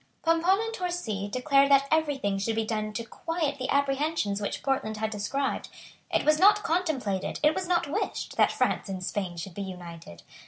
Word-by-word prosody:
Pomponne 330 +4 +3
and 450 - -4
Torcy 350 - -3
declared 275 +5 +3
that 275 0 +5
every 315 -3 +2
thing 200 -6 -1
should 220 +3 -1
be 225 0 0
done 215 -1 -2
to 230 +2 -3
quiet 310 +3 -3
the 255 - -3
apprehensions 280 -6 0
which 200 - -3
Portland 260 -6 -1
had 220 0 -2
described. 245 +7 -2 0.4
It - - +1
was 305 0 +4
not 410 +2 +6
contemplated, 310 - -1
it 300 +1 +5
was 370 +1 -3
not 350 -1 +2
wished, 395 +8 -3
that - - +4
France - - 0
and 185 -1 -4
Spain 185 -2 -3
should 170 +2 -6
be 200 - -6
united. 170 - -9
270 Hz, 190 wpm, -28 LUFS, 205-320 Hz, 0.4 s, not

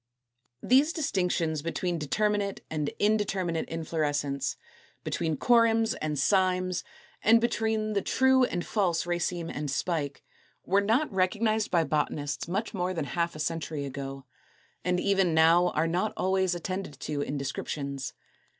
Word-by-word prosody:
These 280 +6 +4
distinctions 180 - 0
between 170 +2 -2
determinate 205 +6 0
and 150 -2 -1
indeterminate 195 -5 0
inflorescence, 145 -5 -1 0.5
between 160 -3 -1
corymbs 230 - +4
and 150 -1 -1
cymes, 185 +3 +2 0.4
and 230 +2 +6
between 220 -2 0
the 200 - +1
true 260 +3 +3
and 175 -8 -1
the - - -11
false 180 -7 0
raceme 175 -1 -2
and 145 0 -4
spike, 145 -1 -2 0.4
were 195 +2 +3
not 225 +6 +1
recognized 215 +4 +1
by 170 -2 +3
botanists 145 -1 -2
much 200 +6 -2
more 185 -1 -1
than 160 - -2
half 170 +2 -1
a - - -8
century 155 -2 -2
ago, 135 0 -6 0.6
and 180 0 +1
even 190 -4 +2
now 165 +2 +5
are 155 - +2
not 180 +6 0
always 190 -1 +1
attended 180 -4 -5
to 145 -1 -2
in 145 0 -3
descriptions. 140 -1 -4
175 Hz, 140 wpm, -28 LUFS, 155-205 Hz, 0.6 s, and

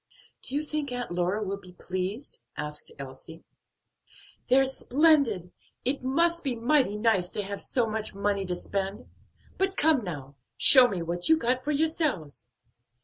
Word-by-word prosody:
"Do 265 - -2
you 295 - 0
think 300 -2 -3
Aunt 245 -4 -4
Lora 180 +4 0
will 200 0 -4
be 180 -2 -15
pleased?" 185 +8 -4 0.2
asked 150 0 -4
Elsie. 140 +4 -10 1.1
"They're 265 +2 +5
splendid! 265 - +2 0.3
It 270 +3 +1
must 335 +6 +1
be 265 -4 -1
mighty 240 -2 +2
nice 210 -5 +2
to 205 - -2
have 200 0 -6
so 245 -3 0
much 215 -2 -4
money 200 0 0
to 180 - -2
spend. 195 +3 -4 0.5
But 385 0 0
come 300 -6 +4
now, 140 -6 -7 0.2
show 260 -3 +9
me 185 -7 -3
what 175 - -3
you 320 - +6
got 250 -2 0
for 295 - -1
yourselves." 290 - -1
220 Hz, 155 wpm, -27 LUFS, 180-280 Hz, 1.1 s, show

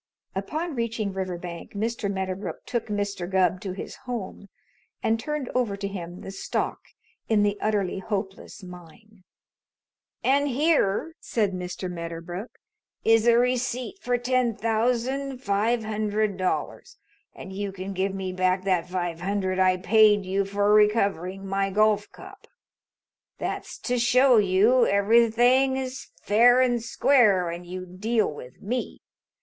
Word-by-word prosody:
Upon 310 - -3
reaching 230 -4 -2
Riverbank 180 -2 -6
Mr. 215 0 -2
Medderbrook 190 0 -4
took 235 -2 -3
Mr. 200 -4 -3
Gubb 185 -1 +2
to 195 -4 -4
his 190 - -8
home 205 -4 -6 0.5
and 225 0 +1
turned 300 +2 -3
over 235 -6 0
to 200 0 -3
him 175 -3 -7
the - - -7
stock 195 - -3 0.5
in 215 -2 +3
the 205 0 +1
Utterly 205 -3 0
Hopeless 195 0 -5
Mine. 180 +3 -14 1.0
"And 280 +2 +3
here," 290 -1 +1
said 210 -4 0
Mr. 180 0 -5
Medderbrook, 170 +4 -6 0.6
"is 225 0 +4
a 235 0 +6
receipt 250 +5 -1
for 245 -7 0
ten 245 -1 +1
thousand 250 +5 -1
five 225 +1 0
hundred 215 -1 -1
dollars, 185 0 -3 0.4
and 190 - -9
you 200 0 -3
can 190 +1 -6
give 190 +1 -1
me 190 -1 -4
back 185 0 +1
that 180 -2 0
five 175 -2 -3
hundred 190 -1 -1
I 185 -1 +4
paid 205 +1 +4
you 195 +1 0
for 200 +1 +1
recovering 200 -3 +2
of - - -9
my 195 0 0
golf 210 +1 +2
cup. 385 +1 -13 0.9
That's - - -5
to 250 -1 -1
show 250 +1 +5
you 210 +5 +4
everything 235 +6 +4
is 260 0 -5 0.2
fair 240 +4 +5
and 245 -2 +2
square 225 -6 +3
when 170 +1 -5
you 185 +1 -6
deal 210 +2 -1
with 125 -3 -12
me. 245 +5 -3
205 Hz, 140 wpm, -25 LUFS, 190-235 Hz, 1.0 s, a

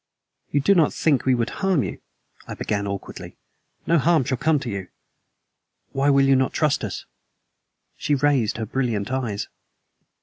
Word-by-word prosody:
"You 145 - +1
do 200 - +4
not 165 -6 +3
think 145 -5 +1
we 130 - +4
would 120 -1 -1
harm 190 -8 +2
you?" - - -6 0.5
I - - -6
began 100 -1 -2
awkwardly. 100 -1 -7 0.5
"No 170 -1 +3
harm 160 -1 +3
shall 130 0 -2
come 160 -1 +3
to 125 - -4
you. 95 -2 -5 1.0
Why 140 +1 +1
will 140 -1 +5
you 135 0 +5
not 130 0 +1
trust 155 -3 +1
us?" - - -5 0.9
She 145 - 0
raised 135 -7 +1
her 110 - -3
brilliant 115 -2 -2
eyes. 120 -6 -2
135 Hz, 165 wpm, -23 LUFS, 115-145 Hz, 1.0 s, will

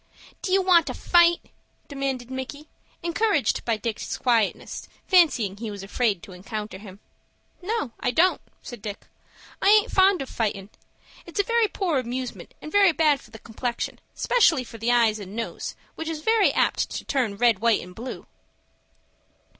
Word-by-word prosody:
"Do 370 - -3
you 385 0 +4
want 355 -3 +5
to - - -4
fight?" 345 -1 +4 0.5
demanded 270 -3 -4
Micky, 270 +3 -6 0.4
encouraged 345 - +1
by 230 -2 +1
Dick's 220 0 -4
quietness, 230 -5 0 0.2
fancying 265 - +3
he 225 +1 -5
was 200 -2 -7
afraid 205 -2 0
to 210 - -11
encounter 205 +2 -6
him. 200 -1 -12 0.6
"No, 415 - -2
I - - 0
don't," 335 +9 +3 0.2
said 240 -4 -9
Dick. 205 -1 -7 0.6
"I 390 - +4
aint 425 0 +5
fond 380 -4 +4
of - - -10
fightin'. 205 -4 -3 0.6
It's 340 - -6
a - - +5
very 465 +1 +2
poor 355 -8 -1
amusement, 250 0 -5
and 305 - -7
very 400 -4 +5
bad 305 -3 +3
for - - -17
the 220 - -11
complexion, 235 +2 -4 0.2
'specially 340 - +3
for 230 -2 -11
the 230 +2 +1
eyes 230 -3 +3
and 200 0 -9
nose, 230 0 -5 0.2
which 320 - -6
is 310 -1 -5 0.3
apt - - +1
to - - -6
turn 235 -7 -1
red, 230 -3 +3
white, 230 0 +3
and 180 +1 -11
blue." 240 +6 -7
250 Hz, 165 wpm, -25 LUFS, 220-340 Hz, 0.6 s, want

